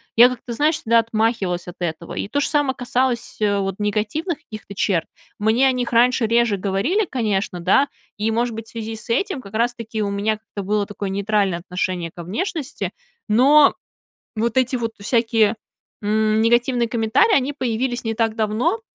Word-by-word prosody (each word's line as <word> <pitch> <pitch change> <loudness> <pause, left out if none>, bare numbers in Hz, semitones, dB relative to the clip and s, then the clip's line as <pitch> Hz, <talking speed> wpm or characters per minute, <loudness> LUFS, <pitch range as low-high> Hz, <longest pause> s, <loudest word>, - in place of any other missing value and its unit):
Я 240 +2 +9
как-то, 245 -1 -6
знаешь, 300 +6 +2
всегда 230 +1 +2
отмахивалась 220 -6 0
от 175 - -8
этого, 170 -1 -4
и - - -3
то 285 - -1
же - - 0
само 290 -3 +2
касалось, 250 -1 -1
э, 205 -1 +2
вот 195 -1 -2
негативных 215 - -1
каких-то 215 -9 -10
черт. 185 -3 0 0.3
Мне 220 +5 +3
о 265 - +4
них 245 -2 -2
раньше 245 +1 +4
реже 230 -2 +2
говорили, 205 - 0
конечно, 205 -7 -1
да, 195 +11 +3 0.3
и, 215 +2 0
может 235 0 0
быть, 225 0 -7
в - - -13
связи 225 -1 -5
с 220 +2 -10
этим 380 - 0
как 200 -3 -13
раз 240 +2 +1
таки 225 -2 -5
у 205 - 0
меня 210 +2 0
как-то 215 -2 -8
было 205 +1 0
такое 200 -1 -5
нейтральное 200 -2 0
отношение 180 -1 -3
ко 170 - -9
внешности. 310 - -3 0.4
Но 280 +7 +6 0.6
вот 230 +2 -1
эти 260 0 +2
вот 230 -2 -3
всякие, 225 -1 +2 0.4
м, 215 +1 +1
негативные 240 +1 +2
комментарии, 235 - +3
они 275 +1 +1
появились 245 -1 -2
не 225 0 -1
так 225 -1 0
давно. 230 - 0
225 Hz, 180 wpm, -21 LUFS, 205-250 Hz, 0.6 s, Я